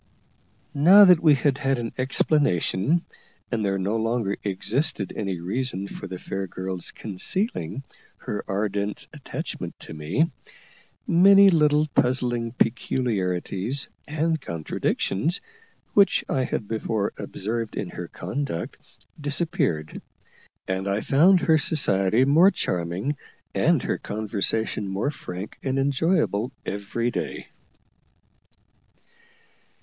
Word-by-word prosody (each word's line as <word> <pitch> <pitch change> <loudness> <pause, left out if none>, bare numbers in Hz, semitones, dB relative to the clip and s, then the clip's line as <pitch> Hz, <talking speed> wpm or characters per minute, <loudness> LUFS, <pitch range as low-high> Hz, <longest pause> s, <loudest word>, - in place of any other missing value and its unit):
Now 180 +8 +8
that 180 -3 +7
we 155 -3 +5
had 140 -1 +1
had 135 -1 +1
an 115 -1 -4
explanation, 135 - +1 0.5
and 115 -3 0
there 95 -1 0
no 100 +4 -1
longer 115 -3 0
existed 105 +4 -1
any 95 -4 -3
reason 100 +2 -1
for 100 - -8
the 90 0 -6
fair 95 +1 -4
girl's 95 0 -5
concealing 125 - -3 0.3
her 105 - -5
ardent 100 0 -2
attachment - - -6
to - - -9
me, 90 - 0 0.7
many 195 +3 +7
little 150 -2 +4
puzzling 120 -2 +1
peculiarities 115 -1 -1 0.2
and 160 +1 0
contradictions, 95 - -1 0.5
which 200 -1 +4
I 130 -1 0
had 105 - -3
before 110 -1 -2
observed 110 +2 -4
in 95 - -3
her 90 - -6
conduct, 95 0 -4 0.4
disappeared; 145 - -1 0.7
and 95 +1 -2
I 100 +2 0
found 175 +6 +5
her 160 -2 +4
society 115 - +2
more 160 +7 +6
charming 90 - -2 0.4
and - - +2
her - - -1
conversation 110 0 -1
more 95 +9 -1
frank 90 -7 -8
and 135 0 -1
enjoyable 135 - +1
every 105 +5 -2
day. - - -5
115 Hz, 110 wpm, -24 LUFS, 95-145 Hz, 0.7 s, Now